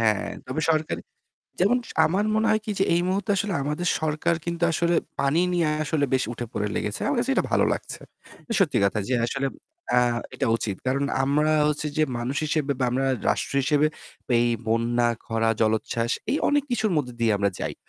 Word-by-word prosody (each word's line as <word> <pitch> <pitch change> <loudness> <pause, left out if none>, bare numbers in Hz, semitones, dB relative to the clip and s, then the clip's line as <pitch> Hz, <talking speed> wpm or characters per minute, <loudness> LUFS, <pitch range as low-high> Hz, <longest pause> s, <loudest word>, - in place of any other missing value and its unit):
হ্যাঁ, 110 -3 +2 0.2
তবে 130 +5 -2
সরকারি, 155 -1 0 0.6
যেমন 200 +8 +4 0.3
আমার 190 +6 +1
মনে 220 +1 +2
হয় 215 0 +2
কী, 215 - -2
যে - - +4
এই 170 - +2
মুহূর্তে 200 +3 -1
আসলে 205 0 -1
আমাদের 150 +5 -2
সরকার 155 +2 0
কিন্তু 170 0 -2
আসলে 170 +1 +1 0.2
পানি 140 +4 +2
নিয়ে 170 -3 +2 0.2
আসলে 155 -2 0
বেশ 130 - +3
উঠে-পড়ে 110 -3 -3
লেগেছে। - - -2
আমার - - 0
কাছে - - 0
এটা - - +2
ভালো - - +3
লাগছে। - - -6 0.4
এটা - - -5
সত্যি - - +2
কথা 100 +2 0
যে, - - +1
আসলে 135 +3 -1 0.5
আ - - +6 0.4
এটা 135 - -1
উচিত। 100 -4 -3
কারণ 135 +2 +1 0.2
আমরা 150 +3 +2 0.2
হচ্ছে 150 0 -1
যে 155 - +4
মানুষ 125 +4 -3
হিসেবে 150 -2 0
বা 125 - +3 0.4
রাষ্ট্র - - -1
হিসেবে 150 +1 +3 0.5
এই 120 - +3 0.2
বন্যা, 120 +1 +2 0.2
খরা, 115 0 0
জলোচ্ছ্বাস, 110 +2 0 0.2
এই 290 - +2
অনেক 290 -1 +2
কিছুর 220 -4 +1
মধ্যে 125 -5 -2
দিয়ে 115 -1 +3
আমরা 100 0 +2
যাই। - - -3
145 Hz, 185 wpm, -25 LUFS, 120-170 Hz, 0.6 s, আ